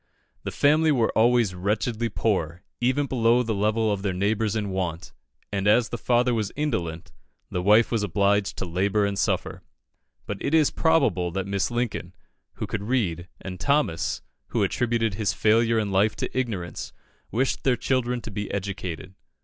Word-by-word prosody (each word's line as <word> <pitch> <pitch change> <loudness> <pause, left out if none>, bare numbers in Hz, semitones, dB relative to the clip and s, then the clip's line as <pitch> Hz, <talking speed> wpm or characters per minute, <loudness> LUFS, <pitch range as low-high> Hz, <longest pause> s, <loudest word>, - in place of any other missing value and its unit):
The - - -4
family 155 +2 +3
were 120 -6 +1
always 115 -3 +3
wretchedly 110 +5 -1
poor, 90 -6 -1 0.2
even 130 +4 +1
below 120 -2 +3
the 115 -2 -1
level 110 +2 +1
of 100 - -4
their 95 -2 -1
neighbours 105 +3 0
in 105 -3 -2
want; 90 -3 -3 0.4
and 100 0 -1
as 110 +2 +4
the 120 - -4
father 125 0 +2
was 110 -3 -1
indolent, 100 - -3 0.4
the 90 - -1
wife 105 +5 +5
was 115 -3 +1
obliged 100 +1 +1
to - - -3
labour 100 +4 +1
and 100 0 -1
suffer. - - -1 0.6
But 100 -2 -5
it 155 - +1
is 155 -3 +4
probable 135 - +2
that 95 0 -2
Mrs. 100 0 -1
Lincoln, 120 -1 -3 0.4
who - - -4
could 100 -1 -4
read, 95 -9 -1
and 90 -1 -7
Thomas, 140 - 0 0.2
who - - 0
attributed 115 -3 0
his 100 0 0
failure 115 +2 +3
in 105 -2 0
life 100 +3 +2
to - - -4
ignorance, 110 -9 -3 0.4
wished 130 +5 -1
their 130 -2 +2
children 125 -2 0
to 110 - -8
be 105 0 -4
educated. 95 -3 -5
105 Hz, 170 wpm, -25 LUFS, 95-120 Hz, 0.6 s, wife